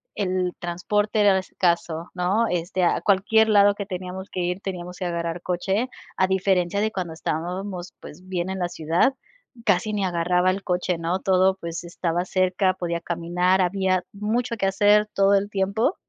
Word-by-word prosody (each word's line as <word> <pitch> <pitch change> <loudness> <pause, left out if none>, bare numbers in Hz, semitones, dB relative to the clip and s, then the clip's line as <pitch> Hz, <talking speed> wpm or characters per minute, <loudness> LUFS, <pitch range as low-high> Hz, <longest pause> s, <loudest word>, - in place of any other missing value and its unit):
el 185 -2 -1
transporte 205 +5 -1
era 200 -2 +5
escaso, 170 -3 -1
¿no?, 190 +6 +1
este, 175 +1 0
a - - +1
cualquier 220 +3 +3
lado 205 -1 +5
que 200 -1 -5
teníamos 185 0 -6
que 185 - -5
ir 180 +2 -2
teníamos 180 -2 -6
que 185 - -5
agarrar 170 0 -3
coche, 195 +7 -1 0.3
a 185 - +2
diferencia 190 -1 +1
de 215 +1 +1
cuando 180 -4 -3
estábamos, 180 +3 -4
pues, 150 - -12
bien 185 -1 -3
en 190 0 -3
la 175 -1 -1
ciudad, 165 - +1 0.5
casi 205 0 +2
ni 200 -2 0
agarraba 180 +1 +2
el 195 +1 -4
coche, 180 -1 -1
¿no? 170 +3 0
Todo, 190 0 +3
pues, 170 0 -5
estaba 175 0 -2
cerca, 185 +1 +1
podía 170 -2 -3
caminar, 175 +2 0
había 185 0 +1
mucho 230 +4 -1
que 195 -2 +1
hacer 205 +2 +4
todo 195 0 +4
el 200 +1 +1
tiempo. 200 - 0
185 Hz, 170 wpm, -24 LUFS, 175-200 Hz, 0.5 s, era